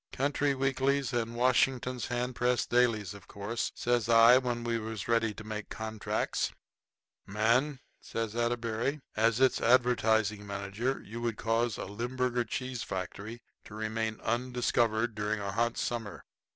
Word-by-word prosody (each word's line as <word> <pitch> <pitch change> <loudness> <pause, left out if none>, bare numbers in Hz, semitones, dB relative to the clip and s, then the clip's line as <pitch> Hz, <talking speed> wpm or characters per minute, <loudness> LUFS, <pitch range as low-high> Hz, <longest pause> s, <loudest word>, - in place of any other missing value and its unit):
"Country 140 +1 +1
weeklies 135 0 +1
and 115 -1 -1
Washington 125 +1 +2
hand 120 +1 -2
press 125 0 +1
dailies, 115 -6 +2
of 100 -3 -13
course," 105 +4 -3
says 120 -2 0
I 115 +2 +8
when 120 -2 -2
we 115 -1 0
was 110 -2 -5
ready 115 -1 +2
to 110 - -8
make 110 -1 -6
contracts. 110 -1 -2 0.8
"Man," 120 +7 +1 0.2
says 115 -1 -4
Atterbury, 120 +3 -1
"as 115 +1 +3
its 130 -1 +3
advertising 110 -4 +3
manager 100 +6 -2
you 115 +4 -7
would 115 -2 -2
cause 115 0 0
a - - -4
Limburger 120 +4 -1
cheese 125 +1 -4
factory 105 +5 -5 0.2
to 105 - -11
remain 110 0 -2
undiscovered 120 -1 +1
during 105 0 -1
a 100 -1 -3
hot 115 +3 0
summer. 115 -4 -3
115 Hz, 140 wpm, -30 LUFS, 110-125 Hz, 0.8 s, I